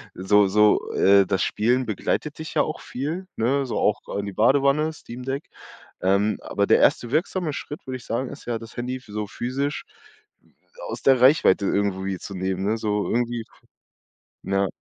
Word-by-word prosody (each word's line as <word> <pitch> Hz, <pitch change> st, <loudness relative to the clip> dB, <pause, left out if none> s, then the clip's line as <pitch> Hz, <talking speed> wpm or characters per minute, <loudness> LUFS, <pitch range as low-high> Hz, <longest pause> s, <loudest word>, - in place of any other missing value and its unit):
so 100 Hz, +2 st, +4 dB
so, 105 Hz, +2 st, +3 dB
äh, 100 Hz, 0 st, +5 dB
das 95 Hz, +1 st, +1 dB
Spielen 125 Hz, +4 st, +1 dB
begleitet 120 Hz, +8 st, -2 dB
dich 160 Hz, 0 st, -6 dB
ja -, -, +4 dB
auch 155 Hz, -, -5 dB
viel, 160 Hz, +9 st, -5 dB
ne, 135 Hz, +4 st, +1 dB
so 120 Hz, -, -3 dB
auch 105 Hz, -, +1 dB, 0.2 s
in 100 Hz, -, -2 dB
die 100 Hz, -, -6 dB
Badewanne, 140 Hz, +7 st, +3 dB
Steam-Deck, 135 Hz, +1 st, -6 dB, 0.6 s
ähm, 100 Hz, +2 st, +2 dB
aber -, -, -1 dB
der -, -, +5 dB
1. 120 Hz, 0 st, +2 dB
wirksame 165 Hz, 0 st, 0 dB
Schritt, 150 Hz, +1 st, -7 dB
würde 130 Hz, 0 st, -3 dB
ich 120 Hz, -, -15 dB
sagen, 125 Hz, +3 st, -2 dB
ist 140 Hz, -, -11 dB
ja, 120 Hz, -1 st, -2 dB
das 115 Hz, 0 st, -12 dB
Handy 125 Hz, +2 st, -3 dB
so 105 Hz, 0 st, -5 dB
physisch 135 Hz, +7 st, -3 dB, 1.1 s
aus -, -, -5 dB
der 135 Hz, -2 st, +5 dB
Reichweite 125 Hz, -7 st, +5 dB
irgendwie 95 Hz, -2 st, -1 dB
zu 100 Hz, -, -8 dB
nehmen, 95 Hz, +1 st, -2 dB
ne, 110 Hz, +2 st, +1 dB
so 105 Hz, -2 st, -1 dB
irgendwie 120 Hz, -1 st, -1 dB, 1.0 s
ja. 100 Hz, 0 st, +1 dB
115 Hz, 170 wpm, -24 LUFS, 100-135 Hz, 1.1 s, äh